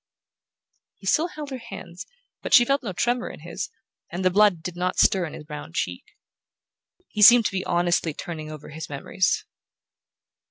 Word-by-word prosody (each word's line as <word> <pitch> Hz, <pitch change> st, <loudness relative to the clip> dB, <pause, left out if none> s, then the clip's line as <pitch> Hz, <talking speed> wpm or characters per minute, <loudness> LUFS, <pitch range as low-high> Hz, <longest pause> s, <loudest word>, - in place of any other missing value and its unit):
He -, -, -16 dB
still 310 Hz, -, +2 dB
held 300 Hz, -4 st, -8 dB
her 260 Hz, -, -5 dB
hands, 195 Hz, -6 st, -9 dB, 0.3 s
but -, -, +3 dB
she 240 Hz, -, +7 dB
felt 275 Hz, +3 st, +1 dB
no 220 Hz, -7 st, -4 dB
tremor 240 Hz, +7 st, -1 dB
in -, -, -11 dB
his, -, -, -5 dB, 0.4 s
and 185 Hz, +2 st, -4 dB
the 185 Hz, -, +4 dB
blood 200 Hz, -4 st, +4 dB
did 180 Hz, 0 st, -5 dB
not 180 Hz, +1 st, -2 dB
stir 185 Hz, -3 st, +4 dB
in -, -, -10 dB
his -, -, -9 dB
brown 150 Hz, -, -9 dB
cheek. 90 Hz, 0 st, -3 dB, 1.0 s
He 210 Hz, -, -4 dB
seemed 235 Hz, +2 st, +9 dB
to -, -, +1 dB
be 190 Hz, -1 st, -2 dB
honestly 175 Hz, -1 st, +1 dB
turning 155 Hz, -3 st, -6 dB
over 155 Hz, -1 st, -10 dB
his 160 Hz, +1 st, -8 dB
memories. 150 Hz, +6 st, -1 dB
185 Hz, 175 wpm, -24 LUFS, 165-230 Hz, 1.0 s, seemed